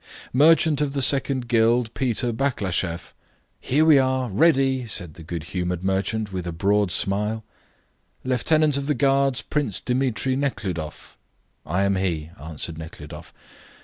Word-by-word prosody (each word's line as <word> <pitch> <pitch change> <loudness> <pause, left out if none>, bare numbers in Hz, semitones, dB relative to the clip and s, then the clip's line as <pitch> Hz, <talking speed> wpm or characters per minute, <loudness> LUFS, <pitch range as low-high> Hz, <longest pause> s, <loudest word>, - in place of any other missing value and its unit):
"Merchant 155 +2 +4
of 145 -2 -1
the 140 - -1
Second 130 -1 +2
Guild, 115 0 +2
Peter 125 -2 -1
Baklasheff!" 95 -9 -2 0.5
"Here 150 +5 +2
we 155 -3 +7
are, 130 -1 0
ready!" 135 - +2
said 90 -7 -4
the 85 - -13
good 80 0 -6
humoured 90 -1 -2
merchant, 100 +2 -1
with 90 -1 -4
a - - -2
broad 100 +4 +1
smile. 105 +5 -1 0.8
"Lieutenant 145 +4 +2
of 140 0 -3
the 150 - +1
Guards, 135 -2 +2
Prince 140 -10 -2
Dmitri 130 0 0
Nekhludoff!" 95 - -4 0.5
"I 90 +6 0
am 100 -1 +1
he," 85 -4 -2
answered 80 +1 -6
Nekhludoff. 80 -1 -10
115 Hz, 140 wpm, -23 LUFS, 90-135 Hz, 0.8 s, we